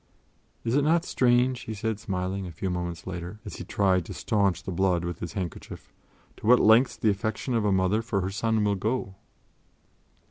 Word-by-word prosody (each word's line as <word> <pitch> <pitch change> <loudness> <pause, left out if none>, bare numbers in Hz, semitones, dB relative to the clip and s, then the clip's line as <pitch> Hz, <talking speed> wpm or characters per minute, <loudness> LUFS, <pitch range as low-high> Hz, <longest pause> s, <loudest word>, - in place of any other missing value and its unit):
"Is 115 - -1
it 145 - +4
not 165 +4 +2
strange," 125 0 +2
he 110 - -6
said, 110 0 -2
smiling, 95 -2 -3
a - - -7
few 90 +3 -3
moments 85 -1 -4
later, 90 +2 -6
as - - -7
he - - -6
tried 95 -3 +1
to - - -8
staunch 100 -4 0
the - - -5
blood 90 -1 +1
with 85 -1 -4
his 85 -2 -5
handkerchief, 90 -4 -6 0.4
"to - - -6
what 125 +1 +7
lengths 115 +4 +5
the 110 - +2
affection 110 +5 -3
of 115 -3 +1
a 105 - +3
mother 95 +3 +2
for 110 -4 -1
her 95 +1 -2
son 110 +1 0
will 105 -1 +2
go!" 105 +1 -2
100 Hz, 200 wpm, -27 LUFS, 90-115 Hz, 0.4 s, what